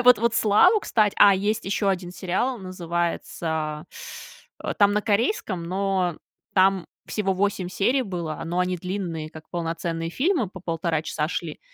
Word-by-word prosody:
это - - +2
вот 250 -1 +8
вот 230 +1 +1
"Славу", 345 - +5
кстати 210 - +2
А, 200 -1 +8
есть 210 +3 0
еще 200 +1 0
один 180 -2 -3
сериал, 190 +8 -1
называется 170 -4 -3 0.9
там 205 0 +5
на 210 - +1
корейском, 210 - 0
но 185 -1 0 0.4
там 190 -1 +4 0.2
всего 195 -3 0
8 190 -1 0
серий 245 +8 +1
было, 170 -8 -4
но 175 +2 -2
они 180 0 0
длинные, 175 -4 -4
как 160 0 -12
полноценные 165 -1 -3
фильмы, 270 - +1
по 185 -1 -11
1,5 165 -2 -1
часа 155 -1 -2
шли, 165 -3 -4
185 Hz, 155 wpm, -25 LUFS, 170-205 Hz, 0.9 s, вот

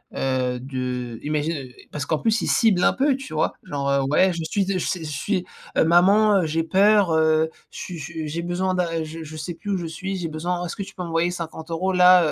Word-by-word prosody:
heu, 130 -2 0
de 125 -3 -4
imagine, 150 +2 -1
heu, - - -16 0.2
parce 150 -2 -4
qu'en 155 - +1
plus 225 +4 +1
ils - - -2
ciblent 210 -6 +3
un - - +4
peu 275 +1 +2
tu 270 -10 -9
vois? - - +1
Genre, 140 -1 -3
heu: 140 0 +3
«Ouais 185 +5 +4
je 170 -1 -4
suis 200 -1 +1
je 195 -2 0
je 175 -1 -2
suis 175 +6 -2 0.3
heu, - - +6
maman, 195 +4 +5
heu, - - -1
j'ai 160 +1 0
peur, 195 +1 +4
heu, 160 0 +3 0.2
je - - -11
suis 180 -2 -6
je - - -6
suis, 160 -2 -5
j'ai 165 +3 -3
besoin 185 +2 -1
d'a 165 -3 -1
je 160 +1 -7
je 155 +1 -9
sais 155 +3 -5
plus 205 - -8
où 195 - +1
je 175 - -4
suis, 190 +5 -4
j'ai 170 -3 -3
besoin, 175 +3 -2
est-ce 170 - -5
que - - -6
tu - - -12
peux 180 - -5
m'envoyer 165 0 0
50 165 -2 -6
euros 185 +3 0
là 180 -1 +7
170 Hz, 250 wpm, -23 LUFS, 155-185 Hz, 0.3 s, là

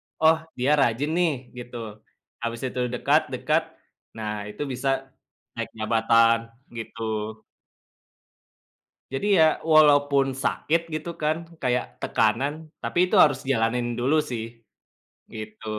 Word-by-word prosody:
"Oh 160 +1 +4 0.2
dia 140 +4 +2
rajin 135 +4 +1
nih," 170 -1 +2 0.2
gitu. 120 -3 -8 0.4
Habis 115 0 -4
itu 125 -1 -1
dekat, 125 0 +2
dekat, - - 0 0.5
nah 105 -2 -4
itu 105 +7 -5
bisa 135 0 -2 0.4
naik - - -4
jabatan 115 +1 +3 0.2
gitu. 110 -1 -4 1.7
Jadi 135 - -2 0.2
ya - - +8 0.3
walaupun 145 -2 +5 0.2
sakit 165 +2 +1
gitu 155 +2 -4
kan, 155 +1 +1 0.2
kayak 125 -1 +1 0.2
tekanan, 120 +7 +1 0.3
tapi - - -4
itu 185 - -1
harus 140 -3 +2
jalanin 115 0 +1
dulu 135 +6 +2
sih 115 -3 -3 0.9
gitu. 110 0 -8
125 Hz, 115 wpm, -25 LUFS, 115-145 Hz, 1.7 s, ya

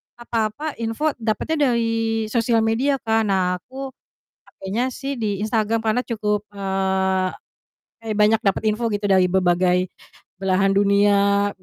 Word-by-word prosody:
apa-apa 235 +5 -3
info 230 +7 -1
dapatnya 280 +7 0
dari 225 -1 0
sosial 230 -1 +2
media 245 +6 +1
kan. 225 -1 +1
Nah 180 -2 +1
aku 265 +5 -8 0.6
pakainya 225 +7 -3
sih 275 -1 -5
di 205 -3 -2
Instagram 220 0 0
karena 225 +3 +1
cukup, 210 -2 -2
eee, 190 -1 0 0.7
kayak 220 -2 -3
banyak 215 +1 +4
dapet 195 +1 +1
info 235 +2 -2
gitu 205 -1 -1
dari 190 -2 +4
berbagai 180 0 +2 0.5
belahan 195 +1 +1
dunia, 200 0 +3
215 Hz, 130 wpm, -22 LUFS, 195-230 Hz, 0.7 s, banyak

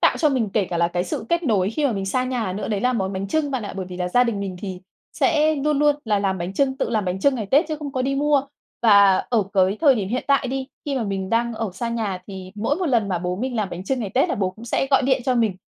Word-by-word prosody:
tạo - - +4
cho 310 - +3
mình 250 -7 0
kể 205 -1 +2
cả 175 - -1
là 170 0 +2
cái 175 +1 -1
sự 255 -4 -4
kết 340 0 +1
nối 205 - +1
khi 290 +4 0
mà 245 - 0
mình 195 -1 -3
xa 255 +6 0
nhà 240 -7 -2
nữa 200 - -4
đấy 205 -2 -1
là 250 +2 +2
món 195 -4 -1
bánh 190 +1 -4
chưng 295 +5 0
bạn 260 -4 -2
ạ. 205 - -6
Bởi 190 -2 -4
vì 180 -1 -8
là 180 0 -2
gia 245 +6 +4
đình 225 -4 -2
mình 190 -2 -4
thì 185 -3 -6 0.3
sẽ 310 -1 +2
luôn 290 +1 0
luôn 295 0 +3
là 210 -2 +1
làm 195 -1 -1
bánh 175 +2 -4
chưng, 265 +1 +1
tự - - -2
làm 215 -4 0
bánh 185 +1 -2
chưng 280 +3 +3
ngày 220 -5 -3
Tết 285 - +4
chứ 310 - -2
không 295 -2 -6
có 255 - -1
đi 275 +1 0
mua. 285 0 +2 0.4
Và 200 -4 +6
ở 225 -4 +3
cái 190 +1 +3
thời 285 -5 +6
điểm 200 -4 -2
hiện 250 +3 -2
tại 280 -2 +2
đi, 265 0 -3 0.2
khi 285 -2 -2
mà 250 - 0
mình 195 -1 -3
đang 235 0 +1
ở 220 -3 -3
xa 235 +5 -3
nhà 220 -5 -2
thì 190 -2 -9
mỗi 225 +8 -1
một 360 -1 -1
lần 230 -7 +2
mà 180 -2 0
bố 180 +1 -3
mình 250 +2 -3
làm 205 -3 -1
bánh 180 +2 -6
chưng 260 +4 -1
ngày 205 -4 -3
Tết 260 - +3
là - - 0
bố 190 -2 -1
cũng 220 +5 -13
sẽ 240 +3 0
gọi 270 - +4
điện 260 -1 +1
cho 255 - +2
mình 220 -6 +1
225 Hz, 315 wpm, -22 LUFS, 195-270 Hz, 0.4 s, Và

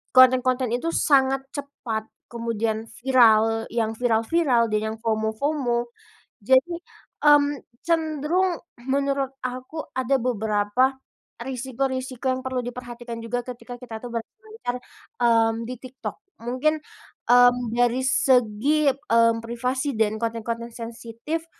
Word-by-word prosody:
konten-konten 255 -1 +5
itu 245 +7 -1 0.2
sangat 270 -1 +4
cepat, 245 -6 -5 0.2
kemudian 230 -1 -2 0.2
viral. 225 -3 +4
Yang 225 -2 0
viral-viral 235 +1 +2
dan 210 - +2
yang 220 - -4
FOMO-FOMO, 235 +4 0 0.7
jadi, 260 - +4 0.5
mmm, 290 -1 +5 0.2
cenderung 330 +2 +1 0.3
menurut 275 0 0
aku 255 +5 -5 0.2
ada 260 +1 +2
beberapa 220 +2 +1 0.4
risiko-risiko 260 +1 -3
yang 255 - -4
perlu 260 0 -2
diperhatikan 240 -1 -7
juga 230 +2 -2
ketika 245 0 -8
kita 225 -3 -8
tuh 245 - -5
berselancar, 430 - -6 0.5
mmm, 225 -1 +4 0.2
di 255 - -4
TikTok. 255 0 -7 0.3
Mungkin, 285 +6 0 0.5
mmm, 245 0 +7 0.2
dari 245 +1 +3
segi, 260 +3 +3
mmm, 230 -4 +2
privasi 250 +4 -2
dan 220 -1 +1
konten-konten 230 +1 -3
sensitif, 235 +7 -5
245 Hz, 110 wpm, -24 LUFS, 230-270 Hz, 0.7 s, mmm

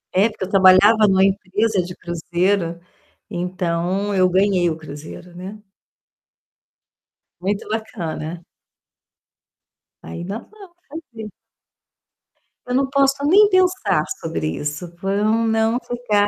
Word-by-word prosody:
É, 200 +5 +4
porque 210 - -7
eu - - -10
trabalhava 200 +3 +6
numa 190 0 +4
empresa 195 +1 +1
de 180 0 -8
cruzeiro, 175 +1 -1 0.5
então 180 +2 -2
eu 185 -1 +3
ganhei 185 -1 +2
o 160 - -3
cruzeiro, 155 +3 -10
né? 190 +4 -8 1.8
Muito 200 +3 -2
bacana. 175 -6 -5 1.6
Ainda 175 - -6
vamos 395 - -16
fazer. 235 -9 -9 1.3
Eu 250 - -4
não 270 0 +1
posso 275 0 +3
nem 405 +6 +6
pensar 370 - +2 0.2
sobre 160 - -3
isso, 150 +4 -4
pra 195 +3 -3
eu 205 +1 +1
não 225 +1 +2
ficar 220 -4 0
195 Hz, 110 wpm, -20 LUFS, 175-225 Hz, 1.8 s, trabalhava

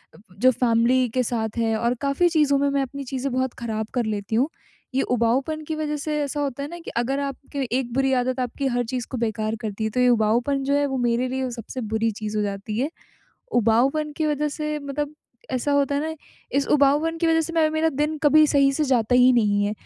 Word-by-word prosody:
अ, - - -15 0.2
जो 255 +3 +6
फ़ैमिली 245 +1 +2
के 255 +3 0
साथ 220 -2 -3
है 225 -1 +1
और 235 +2 +1
काफ़ी 280 +5 +2
चीज़ों 300 -4 +3
में 280 +1 +2
मैं 280 0 +1
अपनी 275 +1 -5
चीज़ें 265 +1 -3
बहुत 260 0 0
ख़राब 220 -2 -3
कर 245 -2 0
लेती 210 0 -3
हूँ। 260 +7 +2 0.5
ये 270 - +3
उबाऊपन 250 +6 0
की 315 - -2
वज़ह 305 -1 -2
से 300 +1 -2
ऐसा 285 +1 -3
होता 280 -1 -3
है 285 - -5
ना, 345 +1 -8
कि 330 - -8
अगर 260 +4 0
आपके 280 0 -4 0.2
एक 240 -3 -5
बुरी 270 +1 +2
आदत 255 +1 -2
आपकी 255 +2 -2
हर 245 -1 0
चीज़ 245 +1 -4
को 260 - -3
बेकार 220 -1 -1
करती 215 0 -4
है, 220 - 0
तो 250 - -2
ये 250 0 +5
उबाऊपन 240 +4 +2
जो 275 +1 0
है 285 0 +3
वो 270 -1 -2
मेरे 240 0 +1
लिए 260 0 -2
सबसे 240 +2 -6
बुरी 225 +1 +1
चीज़ 215 0 -5
हो 210 - +1
जाती 200 +1 -4
है। 275 +4 0 0.7
उबाऊपन 265 +7 +2
की 315 - 0
वज़ह 300 0 0
से 300 0 -3
मतलब 290 +1 -4 0.4
ऐसा 260 +3 -1
होता 285 0 +2
है 285 - +1
ना 320 +1 -3 0.4
इस 280 - +2
उबाऊपन 295 +3 +3
की 335 - +1
वज़ह 325 0 +3
से 325 +1 -3
मैं 325 -2 +3
मेरा 315 +1 +1
दिन 300 +3 -1
कभी 305 +1 +6
सही 280 -2 +4
से 305 +3 0
जाता 245 -4 +2
ही 250 +1 +6
नहीं 205 -4 +2
है। 205 - 0
265 Hz, 235 wpm, -23 LUFS, 235-290 Hz, 0.7 s, जो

